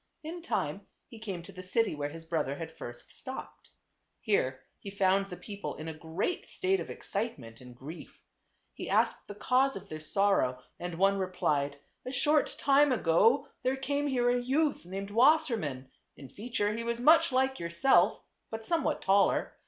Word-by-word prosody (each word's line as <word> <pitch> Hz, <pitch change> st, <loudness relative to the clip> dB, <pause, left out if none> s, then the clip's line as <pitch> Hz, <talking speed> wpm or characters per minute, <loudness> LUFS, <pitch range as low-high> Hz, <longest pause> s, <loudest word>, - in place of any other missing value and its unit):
In 335 Hz, +3 st, -6 dB
time 335 Hz, -, -2 dB, 0.2 s
he 230 Hz, -, -11 dB
came 195 Hz, -6 st, -5 dB
to -, -, -11 dB
the 185 Hz, -, -9 dB
city 210 Hz, +3 st, +1 dB
where 145 Hz, -1 st, -3 dB
his 165 Hz, +2 st, -10 dB
brother 160 Hz, -4 st, -1 dB
had 160 Hz, +2 st, -7 dB
first 120 Hz, 0 st, -9 dB
stopped. 260 Hz, -, -9 dB, 0.5 s
Here 130 Hz, -, 0 dB, 0.2 s
he 200 Hz, -, -8 dB
found 195 Hz, 0 st, +2 dB
the 180 Hz, -, -7 dB
people 205 Hz, -1 st, -6 dB
in 155 Hz, -, -7 dB
a 160 Hz, -, -4 dB
great 165 Hz, -, -3 dB
state 385 Hz, 0 st, 0 dB
of -, -, -6 dB
excitement 125 Hz, -, -5 dB
and 125 Hz, -1 st, -12 dB
grief. 145 Hz, +7 st, -10 dB, 0.5 s
He -, -, -7 dB
asked -, -, +1 dB
the 205 Hz, -, -8 dB
cause 260 Hz, +5 st, +2 dB
of 195 Hz, +1 st, -9 dB
their 155 Hz, -, -6 dB
sorrow 155 Hz, -7 st, +1 dB, 0.2 s
and 175 Hz, -1 st, -5 dB
one 195 Hz, +2 st, +3 dB
replied, 145 Hz, -6 st, 0 dB, 0.2 s
" -, -, -47 dB
A -, -, -3 dB
short 290 Hz, +3 st, +2 dB
time 285 Hz, 0 st, +4 dB
ago 230 Hz, -, +3 dB
there 255 Hz, +1 st, +1 dB
came 285 Hz, +2 st, -1 dB
here 245 Hz, -3 st, +2 dB
a 245 Hz, 0 st, +1 dB
youth 275 Hz, -, 0 dB
named 195 Hz, +2 st, -5 dB
Wasser 275 Hz, +4 st, +5 dB
mann; 135 Hz, -, -5 dB, 0.3 s
in 135 Hz, -2 st, -11 dB
feature 210 Hz, -, -2 dB
he 230 Hz, +2 st, -3 dB
was 235 Hz, 0 st, -2 dB
much 310 Hz, +6 st, +5 dB
like 265 Hz, +1 st, +1 dB
yourself, 175 Hz, +4 st, +3 dB, 0.3 s
but 225 Hz, 0 st, -6 dB
somewhat 320 Hz, -1 st, 0 dB
taller. 195 Hz, +1 st, +3 dB
200 Hz, 180 wpm, -30 LUFS, 165-260 Hz, 0.5 s, Wasser